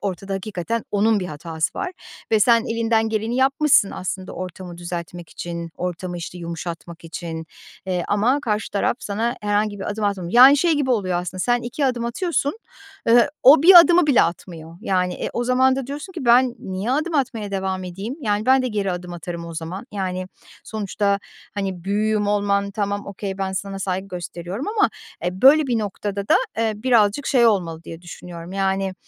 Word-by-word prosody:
ortada 195 Hz, 0 st, -4 dB
hakikaten 205 Hz, +3 st, -3 dB
onun 210 Hz, +1 st, +2 dB
bir 180 Hz, -, -3 dB
hatası 160 Hz, 0 st, -3 dB
var 390 Hz, -2 st, -2 dB, 0.4 s
ve 220 Hz, -, +4 dB
sen 230 Hz, +2 st, +5 dB
elinden 225 Hz, -1 st, +1 dB
geleni 220 Hz, +2 st, -1 dB
yapmışsın 270 Hz, -4 st, +4 dB
aslında 185 Hz, 0 st, -5 dB
ortamı 180 Hz, -1 st, -7 dB
düzeltmek 175 Hz, -1 st, -6 dB
için 170 Hz, -1 st, -6 dB
ortamı, 180 Hz, 0 st, -4 dB
işte, 175 Hz, +1 st, -7 dB
yumuşatmak 170 Hz, 0 st, -7 dB
için, 165 Hz, -1 st, -6 dB, 0.4 s
eee, 180 Hz, -2 st, -1 dB
ama 230 Hz, +8 st, +2 dB
karşı 215 Hz, -4 st, -2 dB
taraf 205 Hz, -, 0 dB
sana 225 Hz, +3 st, -2 dB
herhangi 205 Hz, 0 st, 0 dB
bir 195 Hz, -, -4 dB
adım 210 Hz, +1 st, -3 dB
atmamı 190 Hz, -4 st, -2 dB
Yani 260 Hz, +4 st, +9 dB
şey 335 Hz, +3 st, +2 dB
gibi 290 Hz, -4 st, 0 dB
oluyor 185 Hz, -7 st, +1 dB
aslında 180 Hz, +1 st, -6 dB
sen 240 Hz, +4 st, +1 dB
2 245 Hz, +4 st, -2 dB
adım 245 Hz, -2 st, -1 dB
atıyorsun, 285 Hz, -, -1 dB, 0.5 s
ııı, 240 Hz, +3 st, +6 dB
o 280 Hz, +3 st, +8 dB
1 355 Hz, 0 st, +11 dB
adımı 345 Hz, -1 st, +4 dB
bile 280 Hz, -6 st, +5 dB
atmıyor. 165 Hz, -1 st, -5 dB
Yani 185 Hz, -4 st, 0 dB
e, -, -, -4 dB
o 240 Hz, -, -1 dB
zaman 260 Hz, +1 st, +3 dB
da 270 Hz, -2 st, -3 dB
diyorsun 295 Hz, +7 st, -7 dB
ki, 330 Hz, -8 st, -6 dB
"Ben 245 Hz, +1 st, +5 dB
niye 190 Hz, +4 st, -4 dB
adım 310 Hz, +5 st, 0 dB
atmaya 235 Hz, -7 st, -1 dB
devam 190 Hz, -1 st, -2 dB
edeyim?" 195 Hz, +8 st, -6 dB
Yani, 210 Hz, -3 st, -1 dB
ben 260 Hz, 0 st, +5 dB
de 255 Hz, -, -1 dB
geri 205 Hz, -4 st, -1 dB
adım 180 Hz, 0 st, -6 dB
atarım 170 Hz, 0 st, -6 dB
o 165 Hz, -, -8 dB
zaman. 170 Hz, +7 st, -6 dB
Yani 185 Hz, -2 st, -3 dB, 0.4 s
sonuçta, 205 Hz, -1 st, -1 dB, 0.4 s
hani, 190 Hz, -4 st, -4 dB
büyüğüm 210 Hz, +1 st, 0 dB
olman 200 Hz, -1 st, +1 dB
tamam, 205 Hz, 0 st, -3 dB
okay. 195 Hz, -1 st, -5 dB
Ben 190 Hz, -1 st, -2 dB
sana 195 Hz, +1 st, -4 dB
saygı 190 Hz, 0 st, -3 dB
gösteriyorum 180 Hz, -, -5 dB
ama 420 Hz, -1 st, +2 dB, 0.3 s
e, 180 Hz, +1 st, -3 dB
böyle 295 Hz, +3 st, +7 dB
bir 240 Hz, -3 st, +1 dB
noktada 200 Hz, -1 st, -4 dB
da, -, -, +6 dB, 0.2 s
eee, 225 Hz, -1 st, +1 dB
birazcık 230 Hz, +2 st, +2 dB
şey 245 Hz, -3 st, +4 dB
olmalı, 170 Hz, -7 st, 0 dB
diye 165 Hz, +1 st, -9 dB
düşünüyorum. 175 Hz, 0 st, -9 dB
Yani, 195 Hz, 0 st, -1 dB
200 Hz, 180 wpm, -22 LUFS, 180-240 Hz, 0.5 s, 1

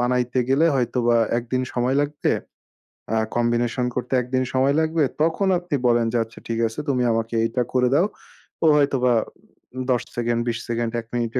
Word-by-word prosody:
বানাইতে 125 Hz, +1 st, 0 dB
গেলে 140 Hz, +5 st, +4 dB
হয়তোবা 120 Hz, -2 st, +1 dB, 0.2 s
১ 120 Hz, -, -6 dB
দিন 130 Hz, 0 st, +1 dB
সময় 125 Hz, +2 st, 0 dB
লাগবে। 145 Hz, 0 st, 0 dB, 0.8 s
আ -, -, +2 dB, 0.2 s
কম্বিনেশন 120 Hz, +1 st, +1 dB
করতে 125 Hz, +1 st, -3 dB
১ 120 Hz, -, -8 dB
দিন 130 Hz, -, +2 dB
সময় 135 Hz, +2 st, +2 dB
লাগবে 160 Hz, 0 st, +1 dB, 0.2 s
তখন 165 Hz, +5 st, +1 dB
আপনি 175 Hz, -4 st, -3 dB
বলেন 120 Hz, -1 st, +3 dB
যে -, -, +2 dB
আচ্ছা 115 Hz, +1 st, -14 dB
ঠিক 115 Hz, 0 st, -2 dB
আছে 110 Hz, +5 st, -7 dB
তুমি 125 Hz, -2 st, +1 dB
আমাকে 115 Hz, 0 st, -2 dB
এইটা 115 Hz, +2 st, 0 dB
করে 125 Hz, -1 st, +3 dB
দাও। 165 Hz, +6 st, +4 dB, 0.6 s
ও -, -, +4 dB
হয়তো 140 Hz, -2 st, +2 dB
বা 125 Hz, -, +4 dB, 0.8 s
১০ 125 Hz, -, +2 dB
সেকেন্ড 120 Hz, 0 st, 0 dB
২০ 120 Hz, -1 st, 0 dB
সেকেন্ড 115 Hz, -1 st, -1 dB
১ -, -, -21 dB
মিনিটে 120 Hz, +1 st, -1 dB
125 Hz, 185 wpm, -23 LUFS, 120-135 Hz, 0.8 s, গেলে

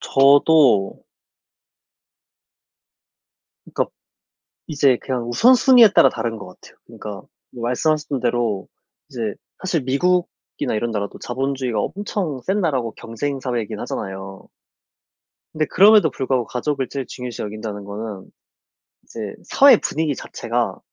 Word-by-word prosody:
저도 140 Hz, -6 st, +4 dB, 2.7 s
그러니까 -, -, 0 dB, 0.8 s
이제 140 Hz, -4 st, +2 dB
그냥 125 Hz, -3 st, -3 dB
우선 240 Hz, -, +5 dB
순위에 250 Hz, -2 st, +7 dB
따라 -, -, +7 dB
다른 115 Hz, 0 st, -4 dB
것 100 Hz, -3 st, -9 dB
같아요. 90 Hz, -, -17 dB
그러니까 105 Hz, -, -9 dB, 0.4 s
뭐 120 Hz, -2 st, -9 dB
말씀하셨던 145 Hz, +3 st, 0 dB
대로 120 Hz, -5 st, -1 dB, 0.4 s
이제 110 Hz, -5 st, -4 dB, 0.2 s
사실 180 Hz, -5 st, -1 dB
미국이나 175 Hz, +2 st, -1 dB
이런 115 Hz, +2 st, -1 dB
나라도 100 Hz, -2 st, -4 dB
자본주의가 130 Hz, -3 st, -2 dB
엄청 185 Hz, -, -3 dB
센 195 Hz, +7 st, -1 dB
나라고 130 Hz, -, -1 dB
경쟁 135 Hz, +5 st, -5 dB
사회이긴 120 Hz, -5 st, -3 dB
하잖아요. 95 Hz, 0 st, -7 dB, 1.0 s
근데 155 Hz, 0 st, -1 dB
그럼에도 200 Hz, -2 st, +5 dB
불구하고 130 Hz, -2 st, -1 dB
가족을 135 Hz, +1 st, -2 dB
제일 135 Hz, -2 st, -5 dB
중요시 125 Hz, -3 st, -7 dB
여긴다는 105 Hz, -1 st, -6 dB
거는 100 Hz, -1 st, -7 dB, 0.7 s
이제 110 Hz, -3 st, -7 dB
'사회 270 Hz, -5 st, +6 dB
분위기 155 Hz, -3 st, -2 dB
자체가' 120 Hz, 0 st, -3 dB
125 Hz, 295 characters per minute, -21 LUFS, 115-150 Hz, 2.7 s, 순위에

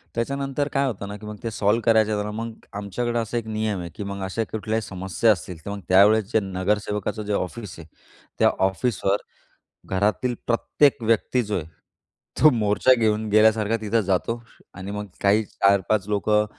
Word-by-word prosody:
त्याच्यानंतर 140 Hz, +4 st, -1 dB
काय 140 Hz, 0 st, +2 dB
होतं 100 Hz, -4 st, -4 dB
ना, 100 Hz, -, -6 dB
की 105 Hz, -, -12 dB
मग 105 Hz, 0 st, -6 dB
ते 115 Hz, -, -2 dB
सॉल्व्ह 105 Hz, +2 st, +1 dB
करायचं 110 Hz, -2 st, +3 dB
तर, 105 Hz, -, -4 dB
मग 115 Hz, +1 st, -5 dB, 0.2 s
आमच्याकडे 115 Hz, +4 st, -2 dB
असा 115 Hz, +1 st, -2 dB
एक 115 Hz, -, -3 dB
नियम 110 Hz, -2 st, -2 dB
आहे, 85 Hz, -, -6 dB
की -, -, -5 dB
मग 100 Hz, 0 st, -5 dB
अशा 95 Hz, +4 st, -2 dB
कुठल्याही 110 Hz, +1 st, -2 dB
समस्या 95 Hz, +2 st, +1 dB
असतील 90 Hz, -2 st, -3 dB
तर -, -, -5 dB
मग 100 Hz, -, -5 dB
त्यावेळेस 100 Hz, +4 st, +6 dB
जे -, -, +4 dB
नगरसेवकाचं 105 Hz, +2 st, -2 dB
जे 105 Hz, -, -2 dB
ऑफिस 100 Hz, +1 st, -4 dB
आहे, 80 Hz, -, -11 dB, 0.5 s
त्या -, -, +6 dB, 0.2 s
ऑफिसवर 100 Hz, 0 st, 0 dB, 0.7 s
घरातील 105 Hz, +6 st, 0 dB
प्रत्येक 130 Hz, +3 st, +2 dB
व्यक्ती 115 Hz, +2 st, +1 dB
जो 105 Hz, -1 st, -2 dB
आहे 85 Hz, -, -3 dB, 0.8 s
तो 155 Hz, -, +9 dB
मोर्चा 110 Hz, +1 st, +3 dB
घेऊन 110 Hz, -2 st, 0 dB
गेल्यासारखा 110 Hz, +1 st, +4 dB
तिथं 110 Hz, +1 st, +1 dB
जातो. 95 Hz, +5 st, -1 dB, 0.3 s
आणि 95 Hz, +2 st, -7 dB
मग 105 Hz, 0 st, -4 dB
काही 105 Hz, +2 st, +3 dB
4-5 100 Hz, +1 st, +1 dB
लोकं 105 Hz, +1 st, +2 dB
105 Hz, 175 wpm, -24 LUFS, 100-115 Hz, 0.8 s, तो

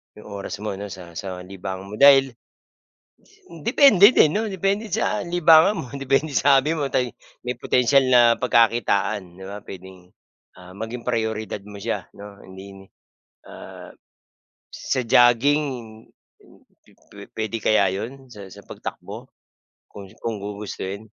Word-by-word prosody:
'yung 105 Hz, -, -14 dB
oras 100 Hz, -1 st, -6 dB
mo 110 Hz, -, -3 dB
'no 105 Hz, -, -6 dB
sa 90 Hz, -2 st, -11 dB
sa 90 Hz, +1 st, -7 dB
libangan 95 Hz, +1 st, -8 dB
mo 105 Hz, -, -6 dB
dahil, 135 Hz, -1 st, +6 dB
s 120 Hz, -, -34 dB, 1.1 s
depende 225 Hz, -, +6 dB
din 155 Hz, -11 st, +4 dB
'no, 215 Hz, 0 st, -1 dB
depende 195 Hz, +3 st, -2 dB
sa 175 Hz, -, -1 dB
libangan 170 Hz, +2 st, +4 dB
mo 130 Hz, -, -6 dB
depende 135 Hz, +2 st, -1 dB
sa 140 Hz, 0 st, +4 dB
hobby 150 Hz, +4 st, 0 dB
mo 145 Hz, -4 st, -3 dB
tay 125 Hz, -2 st, -1 dB, 0.3 s
may 125 Hz, -, -2 dB
potensyal 125 Hz, +2 st, +2 dB
na 125 Hz, -1 st, +6 dB, 0.2 s
pagkakitaan 105 Hz, -6 st, +1 dB
'di 95 Hz, -, -10 dB
ba? 100 Hz, +1 st, -8 dB
Puwedeng, 95 Hz, -1 st, -13 dB, 0.5 s
ah, 90 Hz, 0 st, -14 dB
maging 115 Hz, +4 st, -7 dB
prayoridad 110 Hz, -3 st, -3 dB
mo 105 Hz, 0 st, -12 dB
siya 100 Hz, -2 st, -5 dB
'no. 100 Hz, 0 st, -12 dB
Hindi, 95 Hz, +1 st, -13 dB, 0.6 s
ah, -, -, -12 dB, 0.8 s
sa 130 Hz, -, -2 dB
jogging 120 Hz, -1 st, +2 dB, 0.8 s
pu -, -, -27 dB, 0.5 s
puwede 110 Hz, +1 st, -3 dB
kaya 100 Hz, -3 st, +2 dB
'yon 130 Hz, +7 st, -7 dB
sa 100 Hz, -2 st, -11 dB
sa 100 Hz, +1 st, -15 dB
pagtakbo -, -, -9 dB, 0.6 s
kung 100 Hz, -2 st, -11 dB, 0.2 s
kung 110 Hz, -3 st, -3 dB
gugustuhin? 100 Hz, 0 st, -7 dB
110 Hz, 140 wpm, -22 LUFS, 100-135 Hz, 1.1 s, dahil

